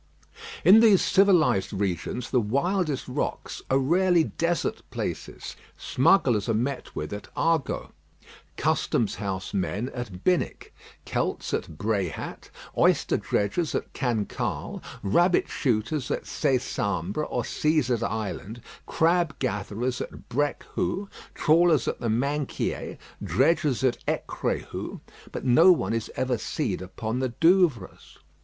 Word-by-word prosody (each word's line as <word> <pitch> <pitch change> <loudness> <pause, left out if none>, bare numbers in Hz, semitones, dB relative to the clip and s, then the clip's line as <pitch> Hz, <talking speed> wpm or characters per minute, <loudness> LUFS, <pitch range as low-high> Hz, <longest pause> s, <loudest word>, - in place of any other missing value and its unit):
In 195 +6 +9
these 215 -5 +6
civilised 180 - +3
regions 100 +5 -2
the 125 - +3
wildest 150 - 0
rocks 125 - -3
are 135 - +4
rarely 170 +5 +3
desert 170 +1 -1
places. - - -5 0.2
Smugglers 125 - +2
are 115 - +2
met 130 +4 -3
with 75 +6 -4
at 105 - -7
Hagot, 165 -4 0 0.7
custom 115 - +1
house 95 -2 -4
men 100 +5 -1
at 105 -8 -7
Binic, 180 -1 0 0.3
Celts - - -2
at 75 - -3
Bréhat, 100 -5 -3 0.3
oyster - - +3
dredgers 125 - -1
at - - -3
Cancale, 120 -6 -2 0.2
rabbit 175 - +3
shooters 125 +2 -1
at - - -2
Césambre 125 - -1
or - - -1
Cæsar's 140 -7 +1
Island, 110 0 -4 0.2
crab 165 -3 +2
gatherers 120 +1 -2
at - - -8
Brecqhou, 145 - -2 0.3
trawlers 165 -1 +4
at - - -2
the 115 - -2
Minquiers, 140 +5 -2 0.3
dredgers 140 - +2
at 130 -2 +1
Ecréhou, - - -3 0.3
but - - -6
no 160 +9 +7
one 170 - +1
is 115 -1 -2
ever 130 -3 0
seen - - -2
upon 110 +6 -4
the 130 -1 0
Douvres. 165 - +1
130 Hz, 120 wpm, -26 LUFS, 105-160 Hz, 0.7 s, In